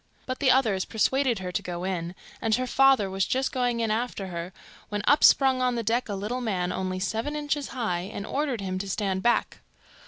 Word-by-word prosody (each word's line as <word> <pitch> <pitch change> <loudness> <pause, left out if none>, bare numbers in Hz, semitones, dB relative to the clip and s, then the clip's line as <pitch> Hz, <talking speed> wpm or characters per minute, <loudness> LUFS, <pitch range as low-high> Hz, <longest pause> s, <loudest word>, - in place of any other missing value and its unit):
But 255 0 -4
the 275 - +3
others 225 -8 +3
persuaded 250 +2 +1
her 185 -1 -5
to - - -1
go 175 0 -5
in, 180 -2 -3 0.3
and 220 -1 +2
her 255 - -1
father 270 -4 +4
was 190 0 -1
just 260 +1 0
going 245 -2 0
in 225 -1 0
after 220 -4 -2
her, 170 +1 -5 0.4
when 205 0 -3
up 290 - +4
sprung 265 -2 +5
on 250 -1 +1
the 230 - -2
deck 230 +2 0
a 200 - -2
little 215 +6 -3
man 185 -6 -1
only 185 0 -2
seven 225 +10 -2
inches 295 -1 -2
high, 195 -7 -3
and 200 - -5
ordered 275 -5 -2
him 185 -1 -3
to 195 +1 -5
stand 195 -1 -1
back. 240 +3 +1
220 Hz, 215 wpm, -26 LUFS, 190-255 Hz, 0.4 s, sprung